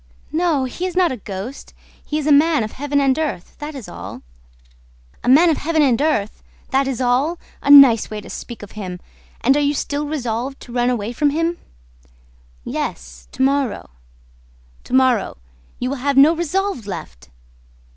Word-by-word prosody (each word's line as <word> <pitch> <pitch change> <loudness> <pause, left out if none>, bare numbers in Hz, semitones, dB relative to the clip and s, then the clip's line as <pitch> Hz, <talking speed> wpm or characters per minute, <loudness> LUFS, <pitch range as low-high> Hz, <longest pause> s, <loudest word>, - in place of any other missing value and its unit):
"No, 320 -4 +1
he 305 +9 -3
is 360 - -7
not 360 -2 +3
a 260 - -4
ghost; 205 +5 -8 0.3
he 300 - -3
is 305 - -3
a 305 - +2
man 295 -2 +4
of 215 - -5
Heaven 285 +1 -1
and 270 0 +2
earth, 295 - -4
that 295 0 -6
is 260 -6 -8
all." - - -9 1.0
"A - - 0
man 325 +6 +6
of 310 - 0
Heaven 320 0 +1
and 255 -3 +2
earth... 255 -10 0 0.3
that 270 0 +2
is 265 -4 -3
all!... 260 +7 +1 0.2
A 280 - -3
nice 275 -6 +8
way 215 - -5
to 210 - -12
speak 235 -3 -8
of 205 - -11
him!... 185 -4 -7 0.4
And 265 +4 +4
are - - +2
you 290 0 +1
still 290 +1 -2
resolved 260 -2 -3
to 240 - -11
run 245 0 +1
away 235 -2 -2
from 290 +4 +2
him?" 330 +3 -1 1.1
"Yes, - - -5
to - - -1
morrow." 275 - 0 0.9
"To - - -9
morrow, 255 - +2 0.4
you 250 - -2
will 280 - -3
have 280 +2 -1
no 300 +5 +7
resolve 345 - -2
left!" 65 - -8
275 Hz, 180 wpm, -20 LUFS, 235-300 Hz, 1.1 s, nice